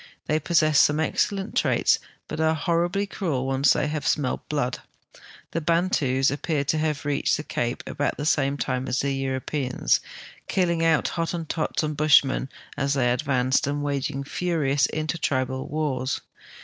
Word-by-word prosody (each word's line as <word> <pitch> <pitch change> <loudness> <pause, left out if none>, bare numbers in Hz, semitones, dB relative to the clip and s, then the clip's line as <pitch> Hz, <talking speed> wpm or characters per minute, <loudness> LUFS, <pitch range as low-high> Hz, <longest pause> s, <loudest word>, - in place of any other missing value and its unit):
They 155 +1 +1
possess 155 -1 +3
some 150 +1 +4
excellent 195 +5 -1
traits, - - +3 0.3
but 155 - -5
are 160 0 +2
horribly 175 +4 0
cruel 160 -10 -2
when 135 0 -1
once 140 +2 +5
they - - 0
have 150 -2 -2
smelled 140 -4 -1
blood. 145 -4 -1 0.7
The 165 - -2
Bantus 150 -6 +2
ai)pear 145 0 -1
to 155 +3 +1
have 155 -2 -1
reached 145 -1 +1
the 150 - -5
cape 120 -4 -3
about 145 - -2
the 145 - -3
same 145 -2 +2
time 130 0 -2
as 125 - 0
the 135 -1 -1
Euro])eans, 130 0 0 0.5
killing 170 -3 +1
out 165 -2 +3
Hottentots 165 -2 -2
and 155 0 -2
Bushmen 145 -3 +4 0.3
as 140 +1 0
they 125 -3 +2
advanced, 130 0 +1
and 145 0 -2
waging 140 -1 -2
furious 145 -4 0
inter 155 +2 -3
tribal 130 -1 -1
wars. 140 -4 -1
145 Hz, 160 wpm, -25 LUFS, 135-160 Hz, 0.7 s, once